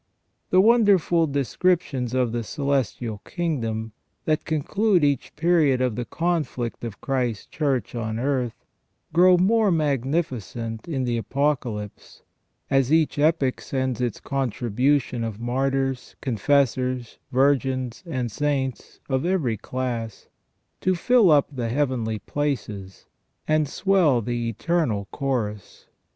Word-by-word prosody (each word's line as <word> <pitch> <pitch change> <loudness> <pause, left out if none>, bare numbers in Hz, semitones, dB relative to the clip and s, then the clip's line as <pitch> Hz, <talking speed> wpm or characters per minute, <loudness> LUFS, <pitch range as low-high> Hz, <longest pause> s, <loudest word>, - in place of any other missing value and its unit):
The 185 - +5
wonderful 200 -7 +4
descriptions 140 -2 0
of 125 -3 +1
the 120 0 -2
celestial 125 -4 -2
kingdom, 115 - -3 0.3
that 155 -1 0
conclude 180 +4 +1
each 140 -3 0
period 155 -5 +3
of 125 -4 0
the 120 - -3
conflict 160 -10 -2
of 115 -4 -6
Christ's 125 -6 -1
Church 130 -7 -1
on 110 -2 -3
earth, 125 -2 -2 0.5
grow 180 +2 +6
more 210 +4 +3
magnificent 130 - -2
in 140 -6 -2
the 120 -1 0
Apocalypse, 115 -3 -3 0.4
as 135 -1 +2
each 160 -2 +2
epoch 145 -4 +2
sends 130 -2 -2
its 120 -3 -2
contribution 125 0 0
of 110 -2 -4
martyrs, 135 +1 -1
confessors, 130 0 0
virgins, 130 -2 +1
and 125 -7 -2
saints 135 0 -2
of 130 -1 0
every 170 -11 +1
class, 115 -1 -4 0.5
to 185 0 +1
fill 225 +3 +4
up 145 -3 +5
the 120 -3 -2
heavenly 120 -4 0
places, 105 -9 -4 0.4
and 155 -2 +2
swell 180 -8 +3
the 120 0 -2
eternal 115 - -1
chorus. 115 -8 -3
130 Hz, 115 wpm, -24 LUFS, 120-155 Hz, 0.5 s, grow